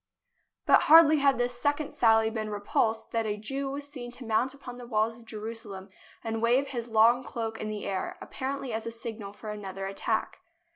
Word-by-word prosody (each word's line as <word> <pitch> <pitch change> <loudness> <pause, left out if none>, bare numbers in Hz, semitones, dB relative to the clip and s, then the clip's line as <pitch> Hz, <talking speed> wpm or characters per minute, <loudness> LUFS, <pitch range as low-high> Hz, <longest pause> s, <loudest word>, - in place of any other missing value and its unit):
But - - +6
hardly 315 -1 +9
had 275 -1 +3
this 245 0 -2
second 290 +1 0
sally 225 -1 +4
been 215 -1 -3
repulsed 220 +2 -1
than 225 -1 0
a 210 0 -2
Jew 270 +6 -3
was 280 +1 -5
seen 250 -4 -8
to 250 0 -9
mount 225 +4 +1
upon 255 -3 -10
the 245 - -9
walls 220 -1 +1
of 235 0 -16
Jerusalem 215 -3 -7 0.3
and 225 0 -2
to - - -2
wave 245 +4 +2
his 240 -3 -4
long 230 +2 +4
cloak 225 -3 -4
in 215 - -3
the 215 -1 -4
air, 190 -1 -3
ap - - -12
parently 270 -1 -3
as 220 +1 -3
a - - -3
signal 225 -3 -7
for 210 +1 -8
another 195 -2 -6
attack. 195 0 -2
230 Hz, 205 wpm, -28 LUFS, 215-255 Hz, 0.3 s, hardly